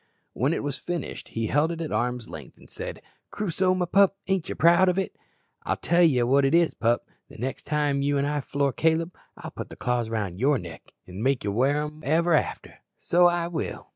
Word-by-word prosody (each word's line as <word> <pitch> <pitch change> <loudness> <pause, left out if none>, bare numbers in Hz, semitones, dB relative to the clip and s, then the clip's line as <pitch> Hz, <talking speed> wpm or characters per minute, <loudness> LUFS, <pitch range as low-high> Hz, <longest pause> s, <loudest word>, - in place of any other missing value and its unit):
When 135 +6 +1
it 165 - -2
was 140 -2 -2
finished 175 -2 -5
he 115 0 -3
held 150 +8 +2
it 165 - -5
out - - -2
at - - -7
arm's 125 -1 -1
length, 75 -5 -10
and - - -17
said, - - -7 0.3
"Crusoe, 185 -2 0
my 180 -1 0
pup, 195 +2 +3
ain't 190 -3 0
ye - - -3
proud 170 +3 +5
of 180 - 0
it? 195 - -2 0.5
I'll - - -2
tell 175 +1 +2
ye 140 -8 +4
what 135 +4 +3
it 135 +4 +3
is, 170 -1 +3
pup, 120 +1 0 0.2
the - - -13
next 130 +4 -5
time 145 -2 +1
you 140 0 +1
an' 140 - +1
I 145 0 -1
floor 140 0 -1
Caleb, 165 +2 +1 0.2
I'll - - -8
put - - -7
the - - -10
claws 120 -2 -1
round 100 -5 -3
your 140 +3 +3
neck, 85 -6 -10
an' 90 +3 -8
make 135 +1 +1
ye 100 - -1
wear 135 +7 +2
em 150 +1 -8
ever 165 +4 +3
arter, - - -3 0.2
so 175 +1 +4
I 175 -1 0
will." 170 -3 -5
145 Hz, 230 wpm, -26 LUFS, 125-170 Hz, 0.5 s, proud